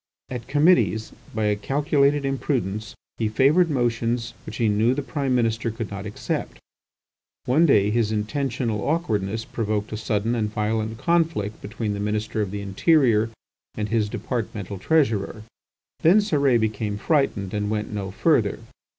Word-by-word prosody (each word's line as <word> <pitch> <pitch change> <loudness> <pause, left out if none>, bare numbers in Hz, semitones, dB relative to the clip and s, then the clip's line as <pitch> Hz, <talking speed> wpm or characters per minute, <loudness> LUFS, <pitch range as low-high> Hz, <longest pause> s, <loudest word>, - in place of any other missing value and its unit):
At 120 -2 -5
committees, 145 -6 +3 0.2
by 110 - 0
a 105 0 +2
calculated 140 +5 +1
imprudence, 115 -7 -2 0.2
he 110 -2 +1
favoured 145 +10 +4
motions 120 -3 0
which - - -6
he 115 - +2
knew 110 +4 +2
the 145 - -2
Prime 135 -2 -1
Minister 115 -1 +1
could 115 -1 -5
not 100 +1 -5
accept. 105 - -4 0.9
One 155 +7 +4
day 105 -7 +4
his 110 -1 +1
intentional 115 0 -1
awkwardness 110 - -1
provoked 105 -2 -2
a - - -2
sudden 110 +1 -1
and 110 -3 -1
violent 110 +1 -1
conflict 160 -8 0
between 105 0 -3
the 100 - -4
Minister 105 +1 -1
of 100 - -1
the 100 +1 -5
Interior, 110 - +3 0.5
and 105 0 -3
his 110 -2 +1
departmental 105 -5 -4
Treasurer. 110 - +1 0.6
Then 170 +6 +6
Cérès 140 - +3
became 110 -1 -1
frightened 105 - 0
and 105 0 -1
went 105 0 -2
no 100 -2 -3
further. 110 - +2
110 Hz, 150 wpm, -24 LUFS, 105-135 Hz, 0.9 s, Then